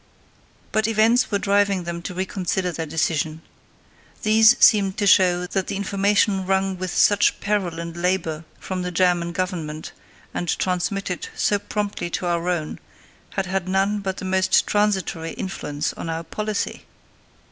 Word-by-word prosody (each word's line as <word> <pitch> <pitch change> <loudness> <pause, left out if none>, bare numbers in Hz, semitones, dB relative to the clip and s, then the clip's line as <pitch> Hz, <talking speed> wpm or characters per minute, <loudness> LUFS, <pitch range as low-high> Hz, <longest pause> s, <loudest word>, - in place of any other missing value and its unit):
But 220 0 +1
events 225 +2 +3
were 205 - +1
driving 200 -1 +1
them 170 0 -5
to 180 - -6
reconsider 185 -1 -2
their 165 -1 -4
decision. 160 0 -1 0.8
These 220 +2 +6
seemed 195 -3 +5
to 205 - 0
show 180 -2 +4
that 190 +1 -2
the 200 - -3
information 200 0 +1
wrung 190 0 +1
with 185 0 -4
such 205 0 +3
peril 195 -6 -1
and 170 0 -6
labour 170 -3 -1 0.2
from 185 -1 -4
the 180 - -2
German 175 -1 +1
Government, 165 -4 -4 0.4
and 175 - -3
transmitted 180 0 -2
so 205 - +1
promptly 205 -3 -3
to 180 - -3
our 170 0 0
own, 165 -4 -2 0.6
had 195 - 0
had 185 0 -2
none 195 +2 +1
but 190 -1 -4
the - - -6
most 190 0 +3
transitory 190 -6 0
influence 150 -6 -4
on 165 - -6
our 165 0 -3
policy. 210 +5 -3
185 Hz, 150 wpm, -23 LUFS, 170-200 Hz, 0.8 s, These